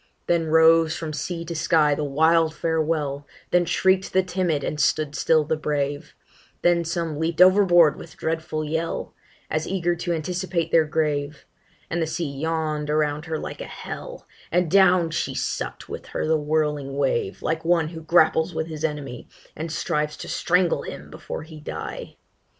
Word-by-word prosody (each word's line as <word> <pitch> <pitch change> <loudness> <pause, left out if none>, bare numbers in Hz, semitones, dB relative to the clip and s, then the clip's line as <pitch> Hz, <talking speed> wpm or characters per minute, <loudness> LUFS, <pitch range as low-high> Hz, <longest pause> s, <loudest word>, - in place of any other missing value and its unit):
Then 170 -2 +1
rose 160 0 +5
from 160 -2 -5
sea 170 +3 -4
to 170 - -5
sky 155 -2 +3
the 150 - -2
wild 160 +3 +3
farewell 155 -3 -1 0.2
Then 180 0 +4
shriek'd 190 +2 +1
the 190 0 +4
timid 175 -5 -1
and 150 - -3
stood 150 -1 +1
still 155 +1 +3
the 155 - -1
brave 145 -2 -3 0.5
Then 175 -1 +3
some 165 -2 -3
leap'd 160 0 -1
overboard 180 -4 +6
with - - -12
dreadful 160 -1 -2
yell, 160 +2 -3 0.3
As 155 0 -2
eager 175 -2 0
to 175 +1 -3
anticipate 175 +1 -2
their 160 -1 +5
grave; 150 -2 -2 0.4
And 170 - -2
the 160 - 0
sea 160 -2 -3
yawn'd 155 0 -2
around 150 0 0
her 160 -1 -3
like - - -6
a - - -4
hell, - - -8 0.2
And 175 -2 +1
down 185 -3 +5
she - - -2
suck'd - - -3
with - - -7
her - - -3
the 160 +1 +2
whirling 150 -2 -1
wave, 130 -8 -1
Like 160 0 -1
one 165 -2 +2
who 165 -1 -8
grapples 160 +1 +3
with 160 0 -1
his 155 -2 -7
enemy, 145 -5 -4 0.3
And 160 +1 -5
strives 150 -2 -1
to - - -8
strangle 180 0 +1
him - - -8
before - - -7
he 155 -1 -11
die. 150 - -7
160 Hz, 170 wpm, -24 LUFS, 150-170 Hz, 0.5 s, overboard